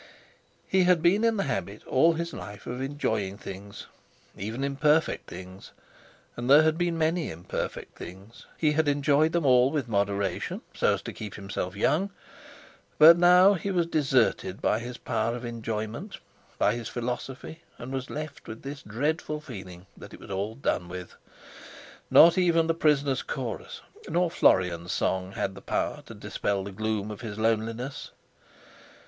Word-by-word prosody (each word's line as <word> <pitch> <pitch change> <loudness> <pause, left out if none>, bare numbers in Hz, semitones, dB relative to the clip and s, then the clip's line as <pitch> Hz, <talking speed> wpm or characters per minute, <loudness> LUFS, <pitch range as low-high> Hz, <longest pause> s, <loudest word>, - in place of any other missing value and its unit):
He 190 -1 +3
had 180 -3 +3
been 195 +6 +4
in 230 -1 +3
the 200 - +1
habit 115 -6 -4
all 165 +6 +4
his 170 +1 -4
life 100 -1 -9
of 125 +1 -5
enjoying 110 -8 -2
things, 100 +1 -9 0.5
even 110 +7 -4
imperfect 150 +3 +1
things—and 95 +6 -11
there 145 +3 +8
had 160 0 +3
been 170 0 0
many 165 +1 0
imperfect 80 +2 -5
things—he 105 - -4
had 155 0 +1
enjoyed 145 +2 +3
them 170 -3 0
all 125 -1 +5
with 140 -4 -2
moderation, 100 -3 -1
so - - +2
as - - -9
to - - -6
keep 105 -3 -7
himself 95 -1 -4
young. 160 - +1 0.9
But 165 +2 +10
now 180 +3 +6
he 200 +1 -3
was 175 -3 +1
deserted 130 - +1
by 110 - +1
his 120 +1 -7
power 115 0 -1
of 120 0 -6
enjoyment, 115 - -5 0.4
by 105 - +3
his 120 -1 -5
philosophy, 125 +5 -5 0.2
and 125 +3 -7 0.2
left 155 -1 -7
with 110 +1 -8
this 140 +1 -6
dreadful 150 +7 -2
feeling 95 - -10
that - - -11
it - - -16
was - - -11
all 100 +3 -3
done 100 -8 -1
with. 90 0 -7 1.0
Not 170 +3 +7
even 170 -2 +3
the 165 - +1
Prisoners' 145 -4 +2
Chorus, - - -5 0.3
nor 175 -1 +1
Florian's 90 - +2
Song, 95 0 -1
had 95 - -2
the - - -11
power - - -2
to - - -9
dispel 100 -1 -2
the 100 - -7
gloom 110 0 -2
of 105 - -8
his 110 -3 -6
loneliness. 115 +4 -1
125 Hz, 155 wpm, -27 LUFS, 100-160 Hz, 1.0 s, But